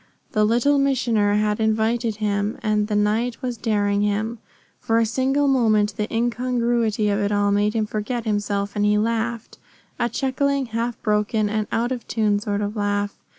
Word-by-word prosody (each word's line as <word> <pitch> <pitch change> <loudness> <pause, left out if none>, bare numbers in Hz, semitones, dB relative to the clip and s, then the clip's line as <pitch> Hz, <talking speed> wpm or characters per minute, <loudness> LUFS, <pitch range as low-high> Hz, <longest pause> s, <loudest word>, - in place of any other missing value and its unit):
The 215 -2 +2
Little 245 +6 +3
Missioner 235 -7 +2
had 210 0 +1
invited 220 +1 +1
him, 205 0 -1
and 210 -1 +1
the 210 - -1
night 220 +3 0
was 250 -1 -2
daring 205 -3 0
him. 215 +3 -1 0.4
For 225 - 0
a 230 - +3
single 265 +5 +1
moment 215 -6 +2
the 210 -1 -3
incongruity 235 -2 0
of 200 0 +1
it 205 0 0
all 205 0 +2
made 205 +2 +1
him 220 -1 +1
forget 215 +3 -3
himself, 205 -1 -1
and 205 - 0
he 210 0 +3
laughed 230 +1 -2 0.4
a 240 - +1
chuckling, 275 +2 0
half 230 0 -3
broken, 210 0 +1
and 215 -1 -1
out 235 +2 0
of 245 -3 -4
tune 210 -2 +1
sort 205 -1 -2
of 205 +1 -3
laugh. 205 -1 -1
220 Hz, 175 wpm, -22 LUFS, 210-235 Hz, 0.4 s, Little